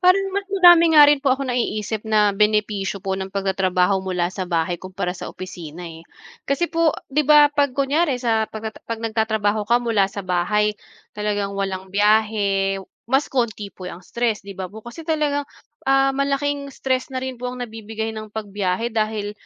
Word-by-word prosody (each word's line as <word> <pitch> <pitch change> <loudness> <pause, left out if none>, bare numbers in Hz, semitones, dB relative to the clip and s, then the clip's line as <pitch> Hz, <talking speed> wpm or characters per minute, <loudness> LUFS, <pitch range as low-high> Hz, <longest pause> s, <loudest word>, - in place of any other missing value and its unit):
Parang 365 +2 +5
mas 400 +1 -2
madami 350 -3 +7
nga 300 - +10
rin 290 -1 +4
po 270 -2 +2
akong 270 -1 -4
naiisip 220 -3 -2
na 210 -1 +4
benepisyo 210 -1 0
po 190 0 -2
ng 190 0 -6
pagtatrabaho 190 -1 +1
mula 180 -1 -1
sa 185 -1 -5
bahay 170 0 -1
kumpara 185 -1 -4
sa - - -7
opisina, 175 -2 -8
eh. 165 0 -12 0.4
Kasi 340 +6 0
po, 330 -2 +2 0.2
'di 300 +2 +1
ba 295 -1 +7
'pag 285 -2 +1
kunwari 280 +2 +1
sa 225 -3 +1
pagtata 220 0 -7
'pag 230 -1 -4
nagtatrabaho 220 -2 0
ka 240 +1 +3
mula 220 -4 +2
sa 200 +1 -6
bahay, 210 +4 +1 0.4
talagang 205 -1 -2
walang 190 -1 -3
biyahe, 205 -1 +2 0.3
mas 270 +3 +2
kaunti 220 -6 -2
po 180 -1 -8
ang 180 +1 -11
stress, 235 -4 -1
'di 200 - -6
ba 185 -1 -5
po. 220 - -10
Kasi 240 +7 -9
talagang, 300 -3 0 0.5
ah, 270 0 +4
malaking 280 +1 -1
stress 260 -1 -2
na 260 - -3
rin 260 0 -4
po 250 - -3
ang 250 - -8
nabibigay 220 0 -5
ng 215 0 -7
pagbiyahe 205 +1 -2
dahil, 215 -1 -1
215 Hz, 180 wpm, -22 LUFS, 195-270 Hz, 0.5 s, nga